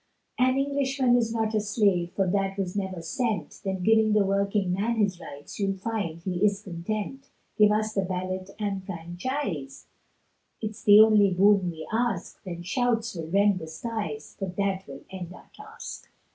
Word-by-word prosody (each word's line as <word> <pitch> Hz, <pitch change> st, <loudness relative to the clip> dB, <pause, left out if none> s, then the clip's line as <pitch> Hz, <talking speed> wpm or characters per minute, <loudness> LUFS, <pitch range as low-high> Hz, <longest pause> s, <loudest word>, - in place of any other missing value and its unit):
An 255 Hz, +1 st, +4 dB
Englishman 275 Hz, -2 st, +2 dB
is 230 Hz, -2 st, +2 dB
not 225 Hz, -1 st, -1 dB
a 215 Hz, -, +3 dB
slave, 200 Hz, -5 st, +1 dB
For 195 Hz, -, +1 dB
that 195 Hz, +1 st, 0 dB
was 190 Hz, -2 st, -2 dB
never 190 Hz, -4 st, -3 dB
sent, 205 Hz, -, -2 dB
Then 190 Hz, -2 st, -2 dB
give 220 Hz, +1 st, +4 dB
the 210 Hz, -2 st, +4 dB
working 195 Hz, -1 st, +1 dB
man 215 Hz, +5 st, 0 dB
his 200 Hz, -5 st, +1 dB
rights, 145 Hz, +3 st, -10 dB
You'll 195 Hz, -1 st, 0 dB
find 195 Hz, -5 st, -3 dB
he 180 Hz, 0 st, -2 dB
is 200 Hz, -1 st, +3 dB
content; 210 Hz, +9 st, -5 dB, 0.3 s
Give 210 Hz, -1 st, +6 dB
us 215 Hz, 0 st, 0 dB
the 195 Hz, -, +1 dB
ballot 185 Hz, 0 st, -3 dB
and 200 Hz, -3 st, -2 dB
franchise, 175 Hz, -, -4 dB, 0.7 s
It's 215 Hz, 0 st, -5 dB
the 205 Hz, 0 st, +8 dB
only 215 Hz, -2 st, +6 dB
boon 195 Hz, 0 st, +4 dB
we 160 Hz, -2 st, -7 dB
ask, 225 Hz, -6 st, -1 dB
Then 175 Hz, -2 st, -6 dB
shouts 230 Hz, +3 st, 0 dB
will 165 Hz, -3 st, -5 dB
rend 200 Hz, +1 st, +3 dB
the 160 Hz, -, -7 dB
skies, 160 Hz, -5 st, -5 dB
For 195 Hz, -, -2 dB
that 195 Hz, +1 st, -2 dB
will 140 Hz, 0 st, -9 dB
end 180 Hz, -2 st, -6 dB
our -, -, -17 dB
task. -, -, -9 dB
200 Hz, 175 wpm, -27 LUFS, 180-220 Hz, 0.7 s, the